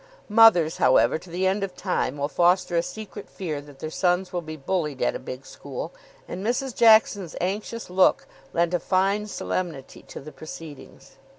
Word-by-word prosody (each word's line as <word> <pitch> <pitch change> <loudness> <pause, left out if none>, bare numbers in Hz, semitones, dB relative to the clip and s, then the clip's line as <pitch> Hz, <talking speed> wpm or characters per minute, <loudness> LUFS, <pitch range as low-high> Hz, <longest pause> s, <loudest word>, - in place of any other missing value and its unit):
Mothers, 210 -7 +6
however, 130 +3 +4
to 180 - -15
the 180 +3 -2
end 195 +2 +1
of 190 -2 -5
time 145 -7 -2
will 145 0 -1
foster 175 +2 +2
a 170 - +4
secret 210 +2 -8
fear 155 -6 -5
that 145 -1 -15
their 155 +3 -6
sons 180 +2 0
will 175 - -1
be 155 -1 -7
bullied 150 -2 -2
at 120 - +1
a - - -5
big 130 +1 -8
school, - - -7 0.3
and 185 +2 -6
Mrs. 245 +3 -1
Jackson's 220 -6 +4
anxious 210 +5 -3
look 185 +1 +3 0.3
lent 170 +1 +1
a 175 - +2
fine 195 +4 +1
solemnity 170 -8 -4
to - - -8
the 155 +3 -10
proceedings. 155 -2 -11
180 Hz, 180 wpm, -25 LUFS, 155-195 Hz, 0.3 s, Mothers